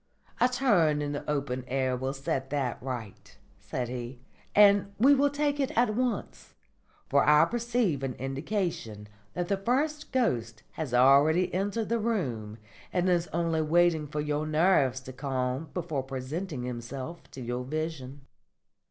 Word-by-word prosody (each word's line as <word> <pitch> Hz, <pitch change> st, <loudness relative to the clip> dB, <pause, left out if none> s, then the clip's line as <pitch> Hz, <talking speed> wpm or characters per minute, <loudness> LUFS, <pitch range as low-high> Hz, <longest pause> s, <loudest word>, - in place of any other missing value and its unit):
"A 245 Hz, -, +4 dB
turn 205 Hz, -, +3 dB
in 145 Hz, -1 st, -2 dB
the 145 Hz, -, -5 dB
open 140 Hz, -3 st, -2 dB
air 130 Hz, -1 st, 0 dB
will 130 Hz, +1 st, -2 dB
set 135 Hz, -1 st, -3 dB
that 135 Hz, -4 st, -2 dB
right," 120 Hz, -6 st, -7 dB, 0.2 s
said 125 Hz, -1 st, -4 dB
he, 120 Hz, 0 st, -6 dB, 0.4 s
"and 200 Hz, -1 st, +6 dB
we 265 Hz, +6 st, +6 dB
will 285 Hz, +1 st, +3 dB
take 290 Hz, 0 st, -1 dB
it 270 Hz, -1 st, +1 dB
at 235 Hz, -2 st, +3 dB
once; 240 Hz, -3 st, -3 dB, 0.5 s
for 140 Hz, 0 st, +3 dB
I 150 Hz, 0 st, +6 dB
perceive 235 Hz, -, 0 dB
an 135 Hz, -2 st, -3 dB
indication 135 Hz, -, -3 dB, 0.3 s
that 175 Hz, 0 st, -2 dB
the 200 Hz, -, +1 dB
first 290 Hz, +9 st, -1 dB
ghost 115 Hz, -, -1 dB
has 155 Hz, -6 st, -5 dB
already 140 Hz, +8 st, +5 dB
entered 205 Hz, +4 st, -1 dB
the 235 Hz, 0 st, +1 dB
room 125 Hz, -, -2 dB, 0.3 s
and 180 Hz, 0 st, +1 dB
is 175 Hz, -1 st, +2 dB
only 165 Hz, -1 st, 0 dB
waiting 160 Hz, -1 st, +3 dB
for 150 Hz, +1 st, -3 dB
your 150 Hz, +1 st, -1 dB
nerves 155 Hz, -5 st, +3 dB
to 130 Hz, 0 st, -9 dB
calm 130 Hz, +2 st, -2 dB
before 165 Hz, -6 st, -2 dB
presenting 135 Hz, +3 st, -5 dB
himself 125 Hz, +6 st, -6 dB
to -, -, -8 dB
your 120 Hz, +1 st, -3 dB
vision." 145 Hz, -1 st, -4 dB
150 Hz, 150 wpm, -28 LUFS, 130-195 Hz, 0.5 s, and